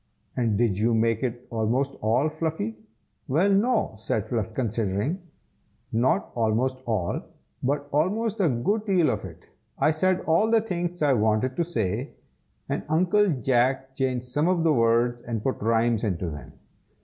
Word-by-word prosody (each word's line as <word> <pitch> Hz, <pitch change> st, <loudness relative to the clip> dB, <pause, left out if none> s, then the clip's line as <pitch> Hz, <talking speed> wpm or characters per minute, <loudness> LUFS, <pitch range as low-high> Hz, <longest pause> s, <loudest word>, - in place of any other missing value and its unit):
"And 115 Hz, -5 st, +1 dB
did 110 Hz, -4 st, +1 dB
you 115 Hz, +1 st, +2 dB
make 115 Hz, 0 st, +1 dB
it 125 Hz, -1 st, -3 dB
almost 120 Hz, +5 st, 0 dB
all, 120 Hz, +7 st, +2 dB
Fluffy?" 155 Hz, -8 st, -3 dB, 0.5 s
"Well 170 Hz, +9 st, +2 dB
no!" 220 Hz, -, +2 dB
said 110 Hz, -1 st, -2 dB
Fluff, 115 Hz, -2 st, -2 dB
considering, 115 Hz, -, -1 dB, 0.7 s
"not 120 Hz, +4 st, +1 dB
almost 120 Hz, +3 st, 0 dB
all, 105 Hz, -7 st, -1 dB, 0.4 s
but 145 Hz, +2 st, -1 dB
almost 210 Hz, +9 st, 0 dB
a 180 Hz, -5 st, +3 dB
good 145 Hz, -, 0 dB
deal 180 Hz, -5 st, +3 dB
of 105 Hz, -3 st, -4 dB
it. 85 Hz, -1 st, -11 dB, 0.3 s
I 155 Hz, -, +3 dB
said 185 Hz, +4 st, +1 dB
all 165 Hz, +7 st, +2 dB
the 225 Hz, 0 st, +5 dB
things 175 Hz, -5 st, -3 dB
I 145 Hz, -2 st, +4 dB
wanted 110 Hz, +3 st, +1 dB
to 170 Hz, -, +1 dB
say, 115 Hz, -, -2 dB, 0.5 s
and -, -, -2 dB
Uncle 185 Hz, +6 st, +3 dB
Jack 130 Hz, -1 st, +1 dB
changed 130 Hz, -2 st, -1 dB
some 145 Hz, +6 st, 0 dB
of 180 Hz, -2 st, +2 dB
the 160 Hz, -2 st, +4 dB
words, 120 Hz, 0 st, +2 dB
and 115 Hz, -3 st, -4 dB
put 135 Hz, -, -2 dB
rhymes 115 Hz, 0 st, +2 dB
into 90 Hz, -5 st, -1 dB
them. 75 Hz, -4 st, -9 dB
125 Hz, 160 wpm, -26 LUFS, 115-160 Hz, 0.7 s, the